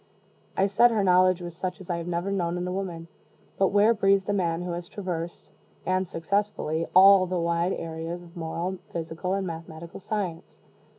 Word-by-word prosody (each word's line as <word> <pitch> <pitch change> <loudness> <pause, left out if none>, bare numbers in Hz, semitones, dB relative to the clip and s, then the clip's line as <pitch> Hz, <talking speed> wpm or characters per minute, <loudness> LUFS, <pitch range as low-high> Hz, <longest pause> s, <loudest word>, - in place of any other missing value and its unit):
I 195 - +4
said 210 +5 +5
her 220 -3 +1
knowledge 185 -1 +4
was 175 -1 -7
such 185 +3 -4
as 190 - -11
I 175 - -1
have 170 0 -5
never 175 +3 -2
known 175 -3 -1
in 180 +1 -3
woman 175 -4 -4 0.5
but 195 - +5
where 205 +4 +4
breathes 195 -2 +3
the 205 - 0
man 175 -3 0
who 180 - -4
has 175 0 -5
traversed, 175 -4 -5 0.3
and 185 0 +1
successfully, 165 -2 -1
all 190 0 +8
the 180 0 -1
wide 170 +2 +1
areas 165 +1 -5
of 170 0 -16
moral, 175 +2 -3
physical, 170 +3 -3
and 195 -1 -2
mathematical 165 -1 -7
science? 185 -4 -5
180 Hz, 180 wpm, -26 LUFS, 170-195 Hz, 0.5 s, all